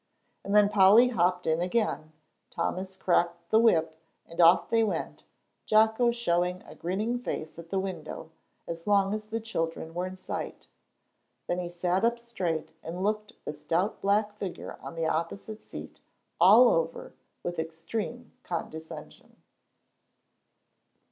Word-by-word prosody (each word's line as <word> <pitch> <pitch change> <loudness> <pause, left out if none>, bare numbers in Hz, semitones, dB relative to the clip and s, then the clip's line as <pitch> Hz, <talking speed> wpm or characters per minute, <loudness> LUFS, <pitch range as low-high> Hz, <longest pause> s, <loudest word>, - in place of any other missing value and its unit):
And 200 - -1
then 210 -1 +7
Polly 205 +4 +6
hopped 180 -5 +1
in 160 +1 +1
again, 180 -5 -1 0.4
Thomas 190 +1 -3
cracked 175 -2 0
the 220 - +6
whip, 160 -8 +3 0.3
and 170 +1 -2
off 170 +2 +6
they 225 0 +3
went, 215 - -3 0.4
Jocko 220 +3 +4
showing 180 -6 0
a - - -12
grinning 210 +8 -2
face 160 -9 -5
at 165 0 -10
the 195 - -1
window, 175 -4 -5 0.4
as 165 +1 -6
long 200 -1 +3
as 215 0 -4
the 225 +1 -3
children 165 -7 -3
were 180 +2 -2
in 185 0 -8
sight. - - -6 0.8
Then 175 - -1
he 175 -1 -4
sat 175 +2 0
up 235 +1 +3
straight 185 -11 -3
and 175 +3 -5
looked 215 +2 -1
the - - -3
stout 170 +7 -1
black 205 +1 +2
figure 190 -3 -5
on - - -8
the 165 0 -1
opposite 170 +7 -3
seat - - -10 0.4
all 215 +8 +8
over 165 0 -1 0.3
with 175 -1 -3
extreme 205 +9 -5
condescension. 160 -4 -7
185 Hz, 140 wpm, -28 LUFS, 170-215 Hz, 0.8 s, all